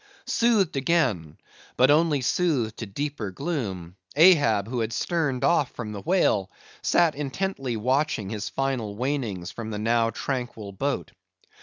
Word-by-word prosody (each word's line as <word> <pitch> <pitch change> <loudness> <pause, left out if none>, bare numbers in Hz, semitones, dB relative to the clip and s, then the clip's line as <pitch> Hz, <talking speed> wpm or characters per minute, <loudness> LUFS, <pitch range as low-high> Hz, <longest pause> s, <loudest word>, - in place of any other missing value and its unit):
Soothed 220 -9 +2
again, 130 - 0 0.4
but 130 +3 +5
only 150 -2 +3
soothed 130 -6 0
to 115 - -5
deeper 140 0 -4
gloom, 95 - -4 0.2
Ahab, 145 - +5
who 125 +1 -3
had 115 0 -2
sterned 145 -4 -1
off 160 -6 +3
from 110 -3 -6
the 100 -2 -6
whale, 160 - +2 0.3
sat 170 -3 +3
intently 140 -3 -3
watching 130 -3 0
his 105 -2 -4
final 130 -6 -2
wanings 115 -8 -2
from 115 -2 -6
the 105 - -4
now 115 +2 +2
tranquil 120 -3 -4
boat. 95 - -2
125 Hz, 140 wpm, -25 LUFS, 105-150 Hz, 0.4 s, but